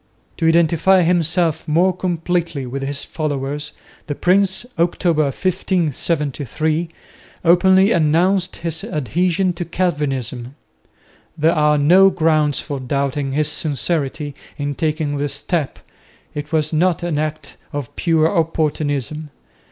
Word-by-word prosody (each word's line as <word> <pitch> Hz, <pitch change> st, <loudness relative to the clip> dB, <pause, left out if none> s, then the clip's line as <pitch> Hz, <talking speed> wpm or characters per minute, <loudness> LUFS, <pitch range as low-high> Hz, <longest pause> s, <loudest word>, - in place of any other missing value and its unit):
To 165 Hz, -, +1 dB
identify 170 Hz, +3 st, +4 dB
himself 170 Hz, -1 st, +1 dB
more 175 Hz, +4 st, +2 dB
completely 170 Hz, -5 st, -2 dB
with 135 Hz, +2 st, -5 dB
his 140 Hz, +1 st, -2 dB
followers, 145 Hz, -1 st, -3 dB, 0.4 s
the 145 Hz, -, -3 dB
prince, 190 Hz, +5 st, +2 dB
October, 170 Hz, -2 st, +2 dB
1573, 155 Hz, -, -1 dB, 0.6 s
openly 190 Hz, +4 st, +5 dB
announced 175 Hz, +3 st, +2 dB
his 165 Hz, -1 st, -4 dB
adhesion 175 Hz, -, 0 dB
to 175 Hz, +1 st, -4 dB
Calvinism. 140 Hz, -8 st, -2 dB, 0.8 s
There 160 Hz, +2 st, +3 dB
are 150 Hz, -2 st, +3 dB
no 180 Hz, +7 st, +6 dB
grounds 155 Hz, -5 st, +1 dB
for 145 Hz, -3 st, -5 dB
doubting 140 Hz, +1 st, -2 dB
his 150 Hz, +1 st, +1 dB
sincerity 145 Hz, -1 st, -2 dB, 0.2 s
in 145 Hz, 0 st, -2 dB
taking 155 Hz, -1 st, -1 dB
this 140 Hz, -1 st, -1 dB
step; 145 Hz, 0 st, -2 dB, 0.6 s
it 150 Hz, 0 st, -6 dB
was 155 Hz, -1 st, 0 dB
not 175 Hz, +2 st, +1 dB
an 165 Hz, -4 st, -1 dB
act 155 Hz, 0 st, -4 dB
of 145 Hz, -5 st, -6 dB
pure 160 Hz, -2 st, +2 dB
opportunism. 155 Hz, -, -1 dB
155 Hz, 115 wpm, -19 LUFS, 145-175 Hz, 0.8 s, no